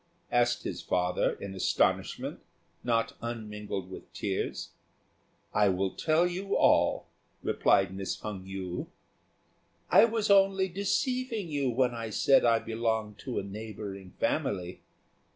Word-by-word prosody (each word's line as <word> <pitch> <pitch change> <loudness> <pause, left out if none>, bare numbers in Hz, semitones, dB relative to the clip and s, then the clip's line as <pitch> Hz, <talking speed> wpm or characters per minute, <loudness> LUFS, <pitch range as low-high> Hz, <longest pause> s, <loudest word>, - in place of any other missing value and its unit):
asked 120 0 +2
his - - -4
father, 90 0 +1
in 100 -1 -7
astonishment, 95 - 0 0.4
not 115 -2 +1
unmingled 105 -5 -5
with - - -10
tears. - - -3 0.8
"I 105 -1 +4
will 95 0 0
tell 160 +2 +2
you 185 +3 -1
all," - - +4 0.4
replied 95 -1 +3
Miss 95 0 -4
Hung 100 -3 -6
yü. 95 -2 -5 1.0
"I - - +8
was 225 -3 0
only 195 -1 +4
deceiving 220 +2 -1
you 140 -3 0
when 125 0 +2
I 115 -1 -4
said 135 +5 +4
I 115 -1 +5
belonged 110 -2 -2
to 130 -3 -5
a - - 0
neighbouring 100 -2 -7
family. 90 -2 -1
115 Hz, 125 wpm, -29 LUFS, 95-155 Hz, 1.0 s, I